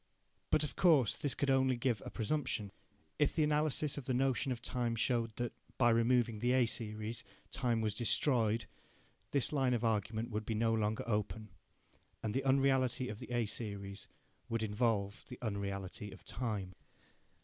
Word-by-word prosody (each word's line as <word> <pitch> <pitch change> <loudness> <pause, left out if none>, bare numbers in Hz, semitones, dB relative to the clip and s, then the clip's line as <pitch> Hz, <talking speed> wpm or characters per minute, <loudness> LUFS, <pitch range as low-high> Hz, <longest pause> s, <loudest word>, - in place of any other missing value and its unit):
But - - +3
of 150 - -4
course 150 - +5
this 145 - -2
could 140 -1 +1
only 130 -1 +3
give 120 -2 0
a - - -6
presumption. 115 -4 -1 0.5
If 145 - +3
the 160 - +3
analysis 150 -1 +1
of 135 - -10
the 130 - 0
notion 135 +1 +1
of 125 - -2
time 120 -1 -1
showed 115 -1 0
that, 120 -1 -3 0.2
by 120 -2 +5
removing 115 -1 +3
the 120 +3 +2
A 130 -1 +5
series, 110 0 -3 0.3
time 120 -4 0
was 110 -2 0
destroyed, 115 -1 +2 0.6
this 140 +1 +1
line 130 -3 +2
of 120 - -2
argument 110 +1 0
would 105 0 -2
be 110 +1 -2
no 115 +1 +2
longer 110 -1 0
open, 105 0 -2 0.7
and 110 -2 -1
the 135 - 0
unreality 130 -2 +2
of 105 - -6
the - - -9
A 120 -2 +1
series 100 -2 -5 0.4
would 115 -1 -1
involve 105 -2 0
the 125 - -8
unreality 100 -2 -4
of - - -13
time. 105 -7 -3
115 Hz, 170 wpm, -35 LUFS, 110-130 Hz, 0.7 s, course